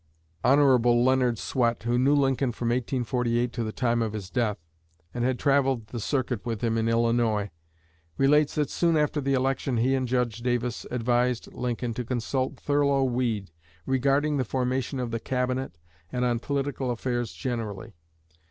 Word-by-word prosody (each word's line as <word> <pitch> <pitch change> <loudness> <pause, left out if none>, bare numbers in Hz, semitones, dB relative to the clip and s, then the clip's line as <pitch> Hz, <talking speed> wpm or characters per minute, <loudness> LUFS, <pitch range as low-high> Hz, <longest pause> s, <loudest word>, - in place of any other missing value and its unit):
Hon. 135 -2 +5
Leonard 120 0 +3
Swett, 120 0 0
who 120 +1 +1
knew 140 +3 +4
Lincoln 135 -2 +2
from 120 0 -2
1848 120 -1 0
to 120 - -2
the 110 - -3
time 120 0 0
of 110 -2 -1
his 100 -4 -6
death, 115 -5 0 0.6
and 120 - -2
had 130 0 +1
"traveled 135 -4 +2
the 120 - -5
circuit" 125 -2 -1
with 115 -3 -3
him 115 -1 +1
in 115 0 +1
Illinois, 115 -3 +1 0.7
relates 145 +2 +3
that 150 -2 0
soon 170 -2 +2
after 150 0 +1
the 135 0 +1
election 130 -1 0
he 125 +4 +2
and 130 -1 0
Judge 120 -2 0
Davis 120 0 -2
advised 120 0 0
Lincoln 120 -1 -3
to 125 - -3
consult 125 +2 -2
Thurlow 140 -1 +2
Weed 120 -7 -1 0.3
regarding 140 +3 +1
the 130 - +1
formation 130 +1 -2
of 125 -2 -3
the 115 - -2
Cabinet 125 -6 -2 0.3
and 125 0 0
on 120 -1 +1
political 140 0 -2
affairs 120 -1 -2
generally. 115 -5 -5
125 Hz, 160 wpm, -26 LUFS, 115-135 Hz, 0.7 s, Hon